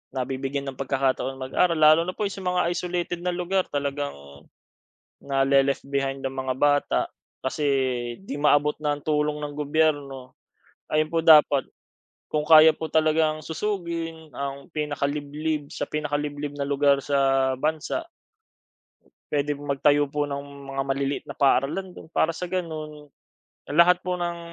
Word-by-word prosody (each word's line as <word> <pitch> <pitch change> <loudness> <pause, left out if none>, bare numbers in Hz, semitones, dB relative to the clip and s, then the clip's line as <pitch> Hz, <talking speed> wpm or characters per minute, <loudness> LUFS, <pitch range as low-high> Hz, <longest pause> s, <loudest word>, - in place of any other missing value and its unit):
nabibigyan 135 +2 -3
ng 130 - -16
pagkakataon 135 0 -1
mag-aral. 170 +7 +1
Lalo 155 +1 +6
na 185 - -4
po - - -3
'yong 200 -1 -3
sa - - -8
mga 180 0 +1
isolated 175 0 -2
na 180 0 -2
lugar 180 +1 0
talagang 140 0 -3 1.1
na-le-left 135 0 +2
behind 135 -1 -1
ang 135 0 -4
mga 130 -1 -1
bata, 145 +1 +2 0.4
kasi 145 +3 -2 0.6
'di 170 -7 -6
maabot 150 0 +3
ng 145 -1 -2
tulong 150 0 0
ng 145 0 -5
gobyerno. 145 -3 -1 0.5
Ayon 155 +1 0
po, 165 - +2
dapat 150 -4 +6 0.6
kung 150 0 -1
kaya 160 0 +9
po 160 +1 -5
talagang 155 0 +2
susugin 165 -2 -4
ang 140 +3 -6
pinakaliblib 150 0 -2
sa - - -4
pinakaliblib 145 -1 -3
na 140 - -2
lugar 140 0 +2
sa 135 -1 +2
bansa 160 - -2 1.2
puwede 145 0 0
po - - -10
magtayo 145 +1 +3
po 145 +1 -1
ng 140 -1 -7
mga 135 0 -1
maliliit 135 +1 -1
na - - -7
paaralan 140 +7 +1
do'n, 175 - -12
para 160 0 +1
sa 180 +2 -5
gano'n, 155 -5 -5 0.7
lahat 180 +1 +6
po 180 -1 -2
ng 175 -1 -3
150 Hz, 140 wpm, -25 LUFS, 140-160 Hz, 1.2 s, kaya